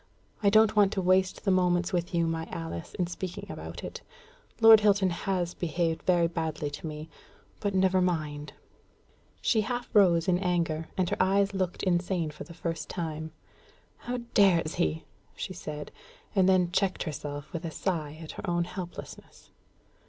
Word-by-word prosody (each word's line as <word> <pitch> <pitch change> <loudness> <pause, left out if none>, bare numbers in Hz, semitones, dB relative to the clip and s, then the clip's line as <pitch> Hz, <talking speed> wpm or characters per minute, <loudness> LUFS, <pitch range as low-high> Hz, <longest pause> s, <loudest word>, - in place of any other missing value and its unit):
I 200 - +5
don't 220 +1 +5
want 205 -2 +5
to 195 - -1
waste 185 +2 +2
the 195 - +3
moments 180 -1 +2
with 175 +1 -1
you, 170 -2 +1
my 165 0 -2
Alice, 165 - -6
in 180 - 0
speaking 175 +1 -6
about - - -8
it. - - -6 0.6
Lord 225 -1 +9
Hilton 200 -3 +3
has 175 0 -1
behaved 165 -1 -1
very 175 -2 +3
badly 160 -3 -2
to 145 - -6
me; 155 0 -6 0.5
but 205 -2 -1
never 190 0 +3
mind." 150 -4 -2 0.9
She 220 - +3
half 240 +3 -3
rose 175 -6 +5
in 180 -1 +3
anger; 170 -4 0
and 185 -2 +2
her - - 0
eyes 195 +1 +3
looked 185 -2 -2
insane 175 -3 0
for 150 - -9
the 170 - -12
first 165 -2 -4
time. 160 -2 -4 0.7
"How 250 +1 -4 0.2
dares 175 -6 +4
he?" 80 0 -1 0.3
she - - -5
said, 150 -1 -7 0.4
and 190 -2 +4
then 180 -2 +3
checked 190 0 0
herself 145 -2 -6
with 170 0 -4
a 165 - -3
sigh 155 -3 -3
at 155 - -7
her 195 - -6
own 175 0 +1
helplessness. 180 0 -9
175 Hz, 165 wpm, -28 LUFS, 160-190 Hz, 0.9 s, Lord